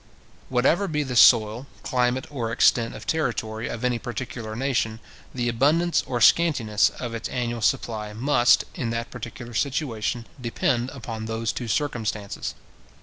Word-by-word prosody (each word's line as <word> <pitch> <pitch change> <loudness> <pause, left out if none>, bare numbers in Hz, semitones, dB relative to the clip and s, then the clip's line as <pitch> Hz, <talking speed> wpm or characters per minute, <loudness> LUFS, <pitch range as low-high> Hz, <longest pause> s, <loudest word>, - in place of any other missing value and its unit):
Whatever 135 +10 +2
be 150 -3 -1
the 130 -3 -4
soil, 115 +1 +5 0.2
climate, 125 -1 0
or 120 -5 -3
extent 115 -1 +3
of - - -9
territory 110 -8 -1
of 120 - -5
any 125 -2 +1
particular 120 -3 -5
nation, 115 -3 -1 0.3
the 120 -2 -2
abundance 150 +9 +2
or 125 -2 -1
scantiness 115 -8 +4
of 120 -2 -4
its 115 -1 -4
annual 120 -2 -2
supply 110 -3 0
must, 120 +2 +3
in 120 - -3
that 115 0 -3
particular 120 +1 -8
situation, 120 -3 -1 0.2
depend 120 +1 0
upon 115 -4 -6
those 115 0 -1
two 120 - -5
circumstances. 110 -5 -2
120 Hz, 145 wpm, -25 LUFS, 115-130 Hz, 0.3 s, soil